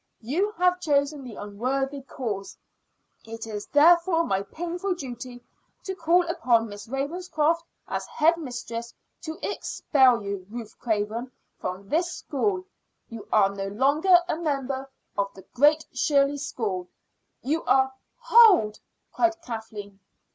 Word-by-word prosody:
You 335 - 0
have 360 0 +3
chosen 285 -3 +1
the 240 -4 -9
unworthy 265 +7 -2
course. 225 -7 -5 0.7
It 225 0 -7
is 210 -2 -6
therefore 335 +3 +5
my 195 -11 0
painful 350 - -3
duty 245 -4 -8 0.4
to 380 - -3
call 345 0 +2
upon 235 -8 +2
Miss 205 +1 -9
Ravenscroft 310 +4 0 0.3
as - - -3
head 325 +2 +3
mistress 240 -5 -6 0.3
to 315 0 -6
expel 255 -6 +2
you, 200 -2 -5
Ruth 230 -1 -8
Craven, 225 +2 -2 0.3
from 185 +2 -5
this 340 - +1
school. 370 +6 -2 0.4
You 230 -2 -9
are 200 -2 +4
no 195 0 -4
longer 285 - +4
a 315 - -1
member 275 -4 -2 0.3
of 200 0 0
the 190 - -12
Great 300 +4 +4
Shirley 280 +3 +2
School; 205 -10 -3 0.6
you 310 +5 0
are 265 0 +3 0.2
" - - -50
"Hold!" 405 - +7 0.3
cried 340 -1 +1
Kathleen. 215 -5 -7
270 Hz, 135 wpm, -26 LUFS, 220-330 Hz, 0.7 s, Hold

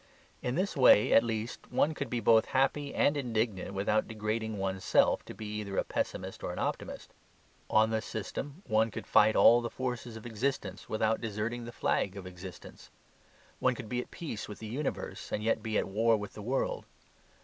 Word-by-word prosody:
In 125 +1 -1
this 190 +2 0
way 125 -6 +6
at 115 - +7
least 115 0 -4
one 155 - +2
could - - -4
be 120 - -1
both 110 0 +5
happy 140 +2 +1
and 145 - +2
indignant 110 -7 -1
without 105 +2 +1
degrading 110 0 -2
one's 95 -1 -2
self - - +3
to - - -9
be 110 - -7
either 100 -2 -5
a - - +3
pessimist - - -3
or - - -2
an - - -7
optimist. - - -4 0.6
On 110 +1 +4
this 110 0 0
system 140 - -5
one 110 +1 +2
could - - -7
fight 110 - +5
all 120 +1 +7
the 120 - -3
forces 125 -2 -4
of 110 - -11
existence 110 -4 -3
without 110 0 +1
deserting 115 +2 -3
the 120 - -7
flag 100 -4 0
of 95 - -7
existence. 90 -1 -10 0.7
One 130 -1 +2
could 120 -4 -8
be 125 0 -1
at - - -11
peace 140 -12 -6
with 105 - -7
the 110 - -8
universe 135 +6 -4
and 105 - -2
yet 115 0 +1
be 110 -1 -1
at - - 0
war 110 +3 +3
with 105 -1 -7
the 105 - -8
world. 130 +6 -1
110 Hz, 195 wpm, -31 LUFS, 105-125 Hz, 0.7 s, at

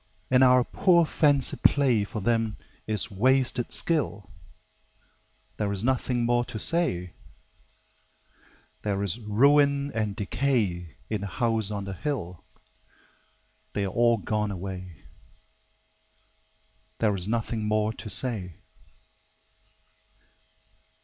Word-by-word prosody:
And 130 0 +5
our 125 -1 +6
poor 170 +4 +3
fancy 145 -3 +3
play 130 -7 +3
For 105 +1 -6
them 115 0 0 0.3
is 110 -1 -2
wasted 125 +3 +1
skill: 140 - -1 1.3
There 105 -2 -1
is 100 0 +1
nothing 125 -1 0
more 120 0 +2
to 110 - -7
say. 105 - 0 1.7
There 100 -1 -1
is 100 +3 -3
ruin 140 +6 +3
and 105 -2 -2
decay 100 - -1
In 105 -2 -1
the 100 - -4
House 110 0 0
on 100 -1 -4
the 100 0 -5
Hill 95 - -4 1.3
They 100 - -1
are - - -2
all 120 0 +3
gone 105 0 -2
away, 90 -3 -7 1.9
There 105 -3 +1
is 90 0 0
nothing 115 -1 -2
more 110 0 +1
to 110 - -9
say. 100 -9 -2
110 Hz, 110 wpm, -26 LUFS, 100-130 Hz, 1.9 s, our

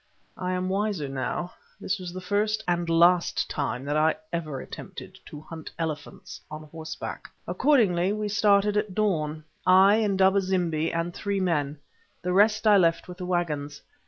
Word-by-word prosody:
I 185 0 -2
am 185 0 -1
wiser 195 -5 -1
now; 135 +6 -3 0.3
this 200 +1 -2
was 180 -1 -6
the 185 +1 -7
first 210 +3 0
and 175 -1 0
last 170 +1 +3
time 140 -2 -3
that 145 +1 -1
I 155 +1 +3 0.2
ever 155 -5 -3
attempted - - -9
to 150 - -9
hunt 160 0 -9
elephants 160 -2 -6
on 155 0 -7
horseback. 155 +1 -7 0.2
Accordingly 190 -4 +3
we 210 0 -2
started 205 0 +3
at 210 -3 -1
dawn, 155 -7 0 0.2
I, 190 +3 +6
Indaba 195 -1 +3
zimbi, 175 -4 0
and 170 +1 -2
three 200 +1 -2
men; 155 -6 0 0.5
the 180 0 -1
rest 215 +3 +4
I 210 -1 +7
left 165 -3 +2
with 180 0 -10
the 180 - -5
waggons. 150 -5 -2
180 Hz, 160 wpm, -26 LUFS, 160-200 Hz, 0.5 s, I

